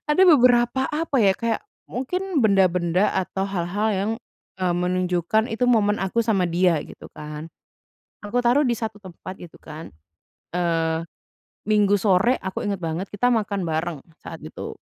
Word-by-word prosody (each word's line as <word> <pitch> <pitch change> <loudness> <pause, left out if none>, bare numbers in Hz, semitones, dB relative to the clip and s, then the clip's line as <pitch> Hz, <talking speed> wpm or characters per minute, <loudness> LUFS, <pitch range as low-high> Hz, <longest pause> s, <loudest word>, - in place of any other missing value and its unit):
ada 370 +6 +4
beberapa 250 -4 +5
apa 300 -2 -1
ya, 195 -1 +5
kayak 230 -1 -1 0.3
mungkin, 355 +6 -2
benda-benda 185 -2 +3
atau 190 +1 -1
hal-hal 195 +3 -1
yang, 200 +3 -1 0.5
eee, 180 -1 +1
menunjukkan 180 +4 0
itu 250 +3 0
momen 210 -3 +3
aku 195 +5 0
sama 200 -5 +2
dia 175 0 +2
gitu - - -12
kan. 150 +1 -8 0.8
Aku 235 +4 -1
taruh 255 +5 +4
di 240 - +2
1 220 -2 -5
tempat 185 +1 -9
gitu 175 - -12
kan. 155 +2 -9 0.6
Eee, 165 -2 0 0.6
Minggu 205 -1 +4
sore, 205 +6 +3
aku 190 -1 -4
inget 200 -2 -2
banget 165 +3 -3
kita 225 +5 +1
makan 205 -3 0
bareng 160 0 -2 0.2
saat - - -9
itu. - - -7
195 Hz, 150 wpm, -23 LUFS, 175-230 Hz, 0.8 s, beberapa